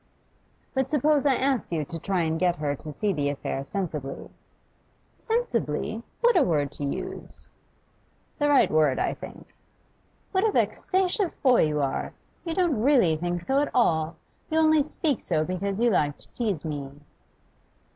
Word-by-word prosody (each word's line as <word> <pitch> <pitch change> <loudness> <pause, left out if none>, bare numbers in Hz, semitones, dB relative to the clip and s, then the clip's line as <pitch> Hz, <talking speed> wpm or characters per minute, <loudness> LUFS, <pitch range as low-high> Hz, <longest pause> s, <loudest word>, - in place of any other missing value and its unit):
'But 265 -1 0
suppose 295 0 +2
I 270 - +4
ask 265 -6 0
you 155 -3 -1
to 165 +3 -7
try 185 +1 0
and 160 0 -1
get 180 -1 +2
her 145 -3 -2
to 150 +2 -9
see 200 +7 -1
the 145 -4 0
affair 135 -1 -3
sensibly?' 150 -4 -5 0.9
'Sensibly? 230 - -1 0.2
What 475 0 +4
a 350 - +6
word 150 - +1
to 145 - -6
use!' 140 - -5 0.9
'The 290 0 +2
right 285 -2 +4
word, 155 -4 +3
I - - 0
think.' - - -11 0.8
'What 380 0 +1
a 440 - +3
vexatious 375 -1 0
boy 250 - +4
you 150 -1 0
are! 135 - -2 0.3
You 330 -1 -3
don't 340 - +1
really 240 - +4
think 175 +2 -2
so 270 +10 +1
at 290 - +1
all. 160 -9 +2 0.3
You 315 - 0
only 315 -1 +5
speak 290 -1 -1
so 155 -3 0
because 195 +3 -3
you 240 0 +3
like 145 -6 +1
to - - -13
tease 205 - -2
me. 145 -3 -4
195 Hz, 165 wpm, -26 LUFS, -, 0.9 s, a